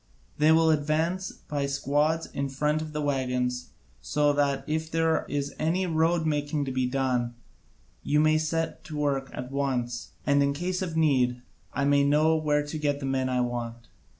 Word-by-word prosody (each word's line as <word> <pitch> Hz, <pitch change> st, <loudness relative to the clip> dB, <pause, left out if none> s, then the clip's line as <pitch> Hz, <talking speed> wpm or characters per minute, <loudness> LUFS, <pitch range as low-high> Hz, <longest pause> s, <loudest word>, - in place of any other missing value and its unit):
They 155 Hz, +1 st, +5 dB
will 160 Hz, 0 st, +5 dB
advance 160 Hz, +5 st, 0 dB
by 145 Hz, -2 st, -4 dB
squads 145 Hz, +4 st, +1 dB
in 140 Hz, 0 st, -3 dB
front 150 Hz, +3 st, 0 dB
of 155 Hz, -1 st, -6 dB
the 150 Hz, 0 st, -3 dB
waggons 125 Hz, -3 st, -1 dB, 0.3 s
so 145 Hz, 0 st, +2 dB
that 140 Hz, -1 st, +1 dB
if 160 Hz, +1 st, -2 dB
there 165 Hz, 0 st, +1 dB
is 140 Hz, -1 st, -2 dB
any 170 Hz, +4 st, +1 dB
road 165 Hz, 0 st, +1 dB
making 145 Hz, -1 st, 0 dB
to 135 Hz, -, -3 dB
be 130 Hz, -1 st, 0 dB
done 125 Hz, -2 st, 0 dB, 0.7 s
you 150 Hz, -, +1 dB
may 155 Hz, 0 st, +4 dB
set 165 Hz, +1 st, -2 dB
to 155 Hz, -, -6 dB
work 140 Hz, -2 st, 0 dB
at 125 Hz, +1 st, -6 dB
once, 130 Hz, -3 st, -2 dB
and 140 Hz, 0 st, +3 dB
in 140 Hz, 0 st, +2 dB
case 180 Hz, +5 st, -2 dB
of 170 Hz, -4 st, -3 dB
need 125 Hz, -6 st, +2 dB, 0.3 s
I 140 Hz, -, -1 dB
may 140 Hz, 0 st, +4 dB
know 150 Hz, +3 st, +4 dB
where 150 Hz, -2 st, +1 dB
to 155 Hz, +1 st, -5 dB
get 145 Hz, -1 st, 0 dB
the 140 Hz, -, -5 dB
men 130 Hz, -1 st, 0 dB
I 125 Hz, -1 st, +1 dB
want. 120 Hz, -1 st, -4 dB
145 Hz, 180 wpm, -27 LUFS, 135-155 Hz, 0.7 s, They